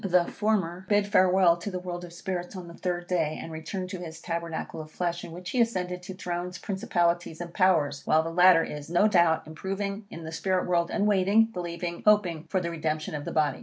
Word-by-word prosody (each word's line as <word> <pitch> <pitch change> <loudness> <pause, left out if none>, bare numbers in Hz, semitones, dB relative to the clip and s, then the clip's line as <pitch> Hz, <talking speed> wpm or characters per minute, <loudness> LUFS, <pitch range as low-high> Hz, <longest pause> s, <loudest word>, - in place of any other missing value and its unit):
The 180 -2 +3
former 190 -5 -1
bid 205 -1 +4
farewell 185 -3 +4
to 175 +4 -5
the 185 - -4
world 180 -1 -5
of 175 - -9
spirits 175 +1 -5
on 180 -2 -7
the 170 - -10
third 175 0 -3
day, 165 -4 0
and 165 - -7
returned 180 +4 -5
to 185 - -5
his 160 -2 -8
tabernacle 170 -1 -4
of 155 - -10
flesh, 175 +1 -2
in - - -8
which 180 +2 -7
he 250 - +2
ascended 180 -6 -1
to 185 +1 -8
thrones, 180 0 -4
principalities, 175 -4 -1
and 175 -1 -6
powers, 160 -7 +2
while 155 +1 +4
the 165 - -4
latter 175 -1 +6
is, 150 0 -7
no 175 +5 +4
doubt, 170 -5 +3
improving 195 +5 -4
in 165 - -8
the 160 - -6
spirit 185 +2 0
world, 170 -1 +1
and 205 - 0
waiting, 210 +2 +4
believing, 170 -1 -4
hoping 185 -7 +3
for 190 - 0
the 170 -1 -3
redemption 155 -2 -2
of 145 -1 -4
the - - -4
body. 150 -4 +1
175 Hz, 220 wpm, -27 LUFS, 165-185 Hz, -, latter